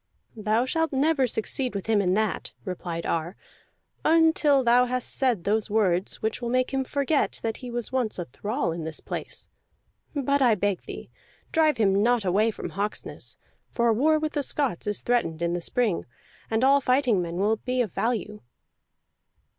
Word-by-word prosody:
"Thou 220 +2 +1
shalt 325 +3 0
never 275 -1 +2
succeed 240 +2 -2
with 195 - -3
him 220 -2 +3
in 185 -1 +1
that," 215 -1 -1
replied 175 -2 -4
Ar, 170 +3 -2 0.7
"until 320 -3 +4
thou 245 +1 +5
hast 250 0 -1
said 245 -9 +1
those 215 +2 0
words 195 -4 +1
which 220 +2 -1
will 240 - -2
make 255 +2 +1
him 270 0 +1
forget 280 +2 0
that 225 -1 -2
he 250 - -8
was 240 0 -4
once 255 -4 -1
a 175 - -3
thrall 210 - -2
in 165 0 -4
this 160 0 -4
place. - - -6 0.7
But 280 0 +1
this - - -4
I 240 -4 +5
beg 200 -1 -1
thee, - - -8 0.4
drive 310 -4 +3
him 200 -2 +3
not 235 -1 +2
away 205 +5 +3
from 220 - -5
Hawksness; 205 +2 -4 0.3
for 235 -1 +2
war 310 +7 +3
with 310 0 -2
the 290 - 0
Scots 270 - -1
is 210 - -1
threatened 170 -10 0
in 170 0 0
the 175 - -2
spring, 220 0 -1 0.4
and 225 +2 +1
all 275 +1 +5
fighting 255 -7 +2
men 170 -1 -4
will 210 +4 +1
be 255 +3 -2
of 215 - -6
value." 215 -3 -2
230 Hz, 180 wpm, -26 LUFS, 200-265 Hz, 0.7 s, thou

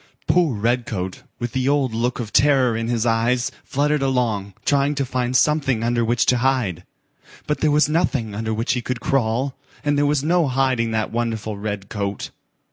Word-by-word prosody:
Poor 170 -8 +2
Redcoat, 110 -4 -2 0.2
with 120 -1 -4
the 130 +1 0
old 140 -5 +1
look 120 +2 -1
of 110 -3 -5
terror 135 -4 +4
in 115 0 -2
his 120 -1 0
eyes, 120 +2 +1
fluttered 150 +1 0
along, 115 -8 -1
trying 140 +1 +2
to 140 -1 -1
find 125 0 0
something 135 -5 +2
under 120 0 +1
which 115 +1 +1
to 125 - +3
hide. 120 -10 0 0.6
But 150 - -1
there 155 - +2
was 150 +1 +4
nothing 145 - 0
under 110 +2 -3
which 115 +5 0
he 125 - -1
could 125 0 -3
crawl, 130 +2 0 0.3
and 145 -1 +1
there 145 - +3
was 145 -1 +1
no 170 0 +2
hiding 130 -3 +1
that 110 -1 -1
wonderful 115 -2 -2
red 100 -1 -5
coat. 100 -2 -4
125 Hz, 185 wpm, -21 LUFS, 110-140 Hz, 0.6 s, terror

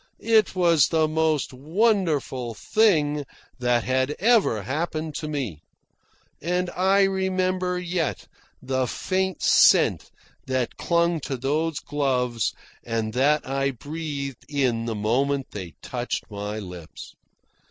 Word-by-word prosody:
It 220 -3 +2
was 170 -6 +4
the 160 -1 +2
most 155 -3 0
wonderful 155 - 0
thing 150 - +2 0.4
that 120 -1 +2
had 130 +3 0
ever 210 - +3
happened 155 - -3
to 155 - -4
me. 130 - -4 0.8
And 180 +2 -1
I 195 +2 +3
remember 185 -1 0
yet 175 -4 -2 0.4
the 130 -1 0
faint 190 +5 -2
scent - - +5 0.4
that 130 -2 -1
clung 170 -1 +1
to 135 -2 -4
those 150 +4 -1
gloves 125 -6 0 0.3
and 115 -2 -2
that 145 +4 +2
I 135 +1 0
breathed 140 0 -5
in 125 -6 0
the 115 -1 -2
moment 130 +6 0
they 90 -7 -7
touched 120 -2 -4
my 105 +1 -4
lips. 90 -6 -9
145 Hz, 120 wpm, -24 LUFS, 125-175 Hz, 0.8 s, scent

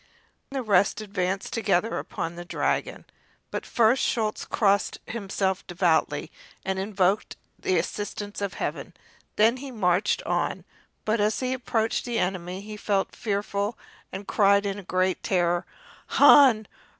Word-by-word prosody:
Then 275 - -5
the 260 - -2
rest 200 -1 +3
advanced 195 -2 -2
together 220 -1 +1
upon 165 - -4
the 175 0 -7
dragon, 175 - -2 0.5
but - - -4
first 235 +2 +3
Schulz 220 -3 -1
crossed 200 -2 +1
himself 195 -3 -2
devoutly 175 -2 +1 0.3
and 190 0 -1
invoked 195 0 0 0.2
the 185 - +1
assistance 205 +3 -4
of 200 -2 -3
Heaven. - - -4 0.4
Then 225 +4 +4
he 275 +1 -7
marched 200 -4 +1
on, - - -1 0.4
but 215 0 +1
as 210 +1 +1
he 255 0 -1
approached 230 -3 -1
the 240 -2 -2
enemy 180 0 -2
he 210 +1 -8
felt 200 -2 -1
very 210 - -2
fearful 205 +2 -2 0.3
and 195 +1 -7
cried 200 0 +4
in 200 0 -3
great 185 0 0
terror: 175 -1 +1 0.5
"Han! 260 -7 +7
200 Hz, 140 wpm, -26 LUFS, 185-220 Hz, 0.5 s, Han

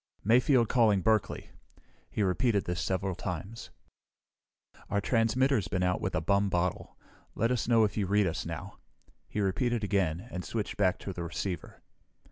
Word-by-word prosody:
"Mayfield 120 +2 +4
calling 110 -6 +3
Berkeley." 110 0 0 0.6
He 105 - -1
repeated 100 +2 +1
this 90 -1 -2
several 95 0 -1
times. 90 +6 -6 1.2
"Our 100 - +1
transmitter's 115 +1 +2
been 90 -3 -1
out 90 0 +1
with - - -2
a 80 - +1
bum 100 +4 +2
bottle. 90 -1 -2 0.4
Let 115 +3 +1
us 125 - 0
know 115 -2 +5
if 105 - 0
you 100 -3 0
read 105 +1 +3
us 85 -1 -2
now." 85 +4 -7 0.5
He 105 - -2
repeated 110 +4 0
again 95 -2 0
and 90 - -4
switched 110 -3 -3
back 95 -3 +2
to 95 - -5
the 85 - -6
receiver. 85 +2 -5
100 Hz, 160 wpm, -30 LUFS, 90-115 Hz, 1.2 s, know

